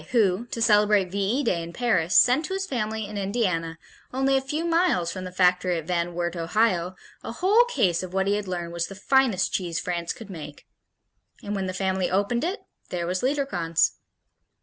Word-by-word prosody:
who, 215 -1 +2
to 230 -1 -2
celebrate 210 -4 +4
V 200 - -3
E 220 +9 +1
Day 185 -9 0
in 165 0 -7
Paris, 185 -8 +1
sent 260 +6 +5
to 380 - -3
his 390 0 -2
family 220 - -2
in 205 0 -5
Indiana, 185 -6 -1 0.3
only 270 +1 +1
a 265 - +2
few 300 +5 -3
miles 330 - +2
from 185 -1 -6
the 185 - -6
factory 180 -1 +2
at 160 - -5
Van 175 0 -1
Wert, 175 0 -2
Ohio, 180 +1 0 0.3
a - - -5
whole 400 - +4
case 190 - +1
of 185 -1 -7
what 190 +1 0
he 200 - +2
had 205 -1 -2
learned 175 -2 -4
was 170 0 -2
"the 195 - -9
finest 235 -2 +2
cheese 175 -3 -1
France 170 -1 -3
could 215 -3 -9
make." 150 -4 -9 0.8
And 205 - -4
when 195 -2 -2
the - - -2
family 190 -1 -1
opened 205 +6 0
it, 370 +6 -2 0.3
there 175 -1 -3
was 185 +2 -2
Liederkranz. 255 - +1
195 Hz, 200 wpm, -25 LUFS, 175-240 Hz, 0.8 s, sent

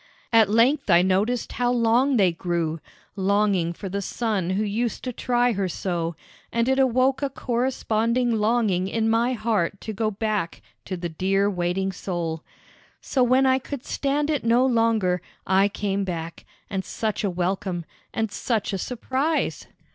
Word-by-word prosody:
At 220 -3 +6
length 240 +5 +3
I 175 0 +6
noticed 200 +6 +1
how 245 0 0
long 245 +3 +3
they 190 -4 +4
grew, 165 -2 -2 0.4
longing 195 -3 +2
for 195 +3 -7
the 200 +2 -3
son 205 -3 -1
who 195 +3 0
used 220 +3 -2
to 250 - -3
try 245 +1 +1
her 195 -3 -1
so, 170 -1 -2 0.4
and 235 +1 +1
it 265 +1 +2
awoke 260 +1 +3
a 280 - 0
corresponding 240 -1 0
longing 215 -4 +1
in 220 +2 0
my 235 +3 +2
heart 215 -5 0
to 220 - -5
go 215 +1 0
back 210 -4 -2 0.2
to 185 - -4
the 175 0 -3
clear 195 +5 +1
waiting 180 +1 -1
soul. 170 -4 -4 0.6
So 265 - -1
when 255 +2 +4
I 260 0 +4
could 270 0 -7
stand 290 +2 0
it 295 - -1
no 235 +3 +4
longer, 225 -7 +2 0.2
I 190 +2 +4
came 200 -1 -2
back, 170 -3 -5 0.2
and 190 -1 -3
such 220 +1 -3
a 200 - +1
welcome, 180 -1 -2 0.3
and 220 -2 -2
such 220 -3 -1
a 195 - -2
surprise! 265 - -1
215 Hz, 160 wpm, -24 LUFS, 185-245 Hz, 0.6 s, At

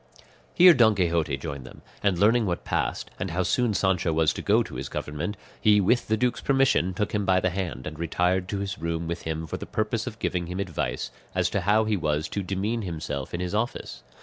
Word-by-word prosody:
Here 180 0 +9
Don 110 -6 +5
Quixote 85 -6 +1
joined 70 -1 -6
them; 65 - -13 0.2
and 100 -3 +2
learning 110 +3 +4
what 85 -1 -2
passed, - - -2
and 90 - -2
how 90 +3 0
soon 115 +3 +1
Sancho 95 -4 +1
was 80 -1 +2
to - - -5
go - - +3
to - - -11
his - - -5
government, 75 +7 -4 0.2
he 105 -1 +5
with 120 +5 +2
the 110 - +1
duke's 125 +2 0
permission 135 -10 +2
took 105 +3 -1
him 105 -1 +1
by 95 -1 +3
the 95 0 0
hand, 90 -8 -4
and 75 0 -6
retired 90 +2 0
to 100 - -3
his 100 0 -4
room 85 0 -2
with 85 +1 -3
him 80 0 -3
for 80 - -5
the - - -8
purpose 110 +2 -1
of 110 -4 -5
giving 90 -2 -2
him 90 +2 -4
advice 95 -5 -3 0.2
as - - +1
to - - 0
how 105 +4 +3
he 110 -1 +1
was 75 -2 -1
to 100 - -2
demean 100 +5 -2
himself 80 -7 -4
in 85 - -3
his 90 +1 -3
office. 110 +3 -3
95 Hz, 230 wpm, -26 LUFS, 85-105 Hz, 0.2 s, Here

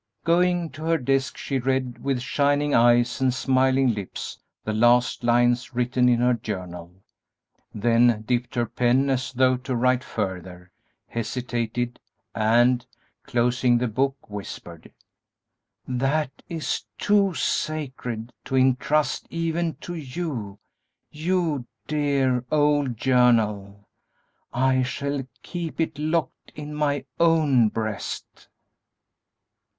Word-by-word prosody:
Going 175 0 +2
to 155 +1 -8
her 165 0 +2
desk, 135 0 0
she 135 -2 -2
read 130 -1 -2
with 135 -3 0
shining 145 +1 +1
eyes 120 +2 +4
and 130 -1 +3
smiling 130 0 +2
lips 100 -3 -6 0.2
the 110 - -2
last 120 +3 +3
lines 120 +1 +2
written 125 0 +2
in 120 -1 +3
her 125 0 +4
journal, 90 -5 -6 0.7
then 115 0 +3
dipped 120 +1 -1
her 120 -1 +1
pen 125 +4 +2
as 130 -1 -1
though 130 0 +3
to 130 0 -4
write 125 +2 +2
further, 90 -5 -5 0.4
hesitated, 120 0 -3 0.3
and, 120 +3 +3 0.4
closing 120 0 +2
the 125 +1 0
book, 135 +5 -1
whispered, 95 -5 -9 1.0
"That 135 +3 0 0.2
is 165 -2 -2
too 200 -3 +2
sacred 125 -7 -3
to 135 - -3
intrust 130 +3 +2
even 165 0 -1
to 175 - -6
you, 135 - -5 0.5
you 160 -5 -1 0.2
dear, 140 -4 +1
old 145 -5 +2
journal! 105 -6 +2 0.6
I 130 +1 +2
shall 135 +1 -3 0.2
keep 170 -3 -5
it 160 -2 -1
locked 155 +2 -2
in 150 0 -7
my 145 -2 -1
own 155 -9 +4
breast." 110 -2 -5
130 Hz, 115 wpm, -24 LUFS, 120-145 Hz, 1.0 s, eyes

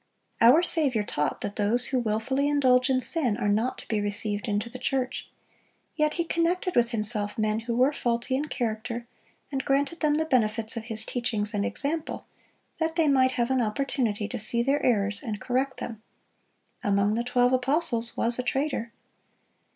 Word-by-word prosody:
Our 255 +9 +7
Saviour 280 -11 +3
taught 150 -7 -2
that 205 - -5
those 225 +4 +1
who 260 - +1
wilfully 240 +5 0
indulge 260 -3 +3
in 260 -1 +3
sin 255 -8 +1
are - - -1
not 220 +5 0
to - - -11
be 215 -2 0
received 205 +2 -2
into 205 +1 -1
the 250 +2 -9
church; 260 0 -2 0.7
yet 305 -1 +1
He 340 - 0
connected 345 +2 0
with 240 -1 +3
Himself 210 -2 0
men 215 0 0
who 230 +1 -3
were 260 +4 +3
faulty 240 0 -1
in 285 +3 -1
character, 235 -2 -3 0.5
and 270 -2 -2
granted 280 +5 0
them 300 -2 +2
the 315 +1 0
benefits 225 -5 +1
of 225 -1 -5
His 225 -2 -3
teachings 230 -4 -2
and 205 -1 0
example, 300 +7 -3 0.5
that 320 0 -1
they 325 -3 +2
might 260 -2 +3
have 240 +1 0
an 260 -1 +2
opportunity 225 -2 -1
to 245 - -4
see 235 +3 +4
their 275 +3 +1
errors 205 -4 +1
and 215 -3 -5
correct 260 +1 -1
them. 225 -2 -6 0.8
Among 200 +1 +2
the 235 +2 -1
twelve 245 +1 +2
apostles 255 -2 0
was 235 +1 +1
a - - 0
traitor. 265 -3 -2
245 Hz, 180 wpm, -26 LUFS, 220-275 Hz, 0.8 s, Our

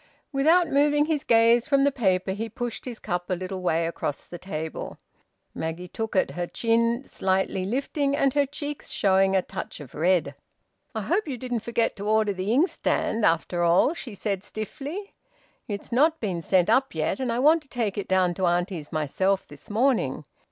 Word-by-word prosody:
Without 320 +5 +4
moving 295 +1 +3
his 305 -3 -1
gaze 230 +1 +4
from 275 -2 +3
the 285 - +4
paper, 190 -7 +1
he 220 +4 -3
pushed 240 +1 -5
his 245 -3 -6
cup 175 -4 -3
a 185 - +1
little 185 +1 -5
way 165 -2 +1
across 165 -3 -3
the 175 - -10
table. 160 -4 -5 0.6
Maggie 165 +3 -4
took 225 +4 -5
it, 185 - +2
her 175 0 -3
chin 230 +4 +1
slightly 190 0 0
lifting, 275 +5 0
and 275 -2 +2
her 285 -1 +2
cheeks 290 +1 -6
showing 195 0 +3
a 190 - +3
touch 190 - -7
of 145 -5 -11
red. 165 -2 +1 0.6
"I 220 - -1
hope 350 - 0
you 265 -4 -3
didn't 245 -1 -2
forget 230 +1 -1
to 200 +1 -5
order 215 -1 +3
the 190 +2 -2
inkstand, 250 - +1
after 170 +1 0
all," 175 - +4
she 245 -10 -8
said 200 -1 -2
stiffly. 290 - -6 0.5
"It's 205 +1 -6
not 310 +6 +3
been 185 -6 -2
sent 180 +2 +2
up 265 +5 +2
yet, - - -1
and 255 -3 -1
I 230 - -1
want 310 +6 +5
to 285 - -20
take 225 -6 -2
it 200 - -4
down 185 -2 +2
to 185 +1 0
auntie's 175 -2 -1
myself 185 +6 0
this - - -14
morning. 245 +4 +1
215 Hz, 185 wpm, -25 LUFS, 185-270 Hz, 0.6 s, want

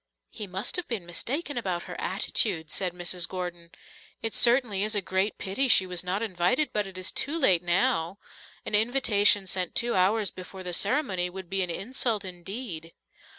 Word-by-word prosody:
"He 210 -3 -6
must 190 - -2
have 360 - -3
been 220 -8 -3
mistaken 265 - -2
about 180 -6 -3
her - - -8
attitude," 160 -8 -1
said 185 -2 +1
Mrs. 175 0 0
Gordon. 175 -2 -6 0.5
"It 225 - -1
certainly 235 -5 +4
is 215 +1 +1
a - - +3
great 190 +3 0
pity 230 +8 0
she 195 -5 +5
was 180 -1 -3
not 185 +4 -2
invited, 195 - 0
but 210 -1 0
it 190 -1 -10
is 185 +1 -2
too 295 +4 -1
late 190 - +4
now. 175 0 +1 0.5
An - - -5
invitation 210 -3 +4
sent 185 -1 -1
two 235 0 +1
hours 195 +2 +2
before 185 +1 -10
the 180 -1 -4
ceremony 190 - 0
would 185 0 -9
be 195 0 +1
an 180 - 0
insult 220 +2 -1
indeed." 180 -2 -6
190 Hz, 180 wpm, -27 LUFS, 180-225 Hz, 0.5 s, she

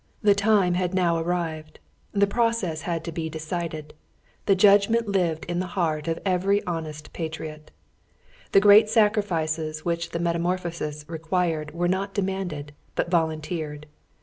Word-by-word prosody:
The 205 -1 +6
time 200 -3 +3
had 180 +1 -1
now 175 -3 +2
arrived, 165 -2 -3 0.3
the 200 -1 +3
process 210 -7 0
had 165 -1 -1
been 160 0 -3
decided, 160 -1 -5 0.5
the 195 - +5
judgment 205 +4 +4
lived 175 -5 0
in 175 0 -2
the 185 - -2
heart 155 -4 0
of 165 0 0
every 195 +2 +2
honest 155 -3 -5
patriot. 155 -2 -6 0.8
The - - +7
great 210 +1 +7
sacrifices 165 -8 +1
which 170 -1 -1
the - - -3
metamorphosis 170 -3 -2
required 165 -1 -2
were 175 +1 +1
not 195 +2 -1
demanded, 185 -7 -3 0.2
but 170 - -1
volunteered. 155 -2 -1
170 Hz, 135 wpm, -25 LUFS, 160-195 Hz, 0.8 s, The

